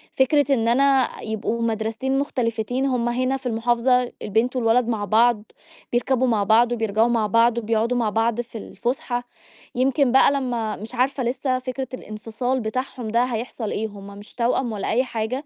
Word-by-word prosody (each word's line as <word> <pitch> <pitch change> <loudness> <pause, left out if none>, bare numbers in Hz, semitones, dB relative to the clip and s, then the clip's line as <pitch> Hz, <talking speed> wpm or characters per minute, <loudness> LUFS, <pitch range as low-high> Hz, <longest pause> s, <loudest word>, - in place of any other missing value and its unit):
فكرة 280 +1 +3
إن 230 -3 +1
أنا 270 +2 +3
يبقوا 220 +1 -3
مدرستين 225 +4 -1
مختلفتين 245 -2 -1
هُم 245 -3 0
هنا 255 +2 0
في 265 - -19
المحافظة 240 +2 +1
البنت 225 +5 0
والولد 235 0 +2
مع 215 -3 -1
بعض، 220 +1 +3 0.5
بيركبوا 255 +1 +1
مع 215 -4 +2
بعض 230 +4 +4
وبيرجعوا 225 -1 +1
مع 230 -3 +1
بعض 230 +2 +3
وبيقعدوا 230 +2 0
مع 230 -3 +1
بعض 225 +2 0
في 235 -1 -10
الفسحة، 245 +2 -3 0.5
يمكن 260 +1 +2
بقى 265 +1 +5
لمّا 240 -6 -2
مش 225 +4 -9
عارفة 260 +1 0
لسّه 255 +1 -1
فِكرة 260 0 -5
الإنفصال 235 +3 -3
بتاعهم 245 +1 -4
ده 235 +3 +2
هيحصل 235 -2 -4
إيه، 220 +1 -2
هُم 200 -1 -11
مش 205 - -14
توأم 240 0 0
ولا 205 - -3
أيّ 245 +3 +2
حاجة، 250 +3 -3
240 Hz, 165 wpm, -23 LUFS, 225-255 Hz, 0.5 s, بقى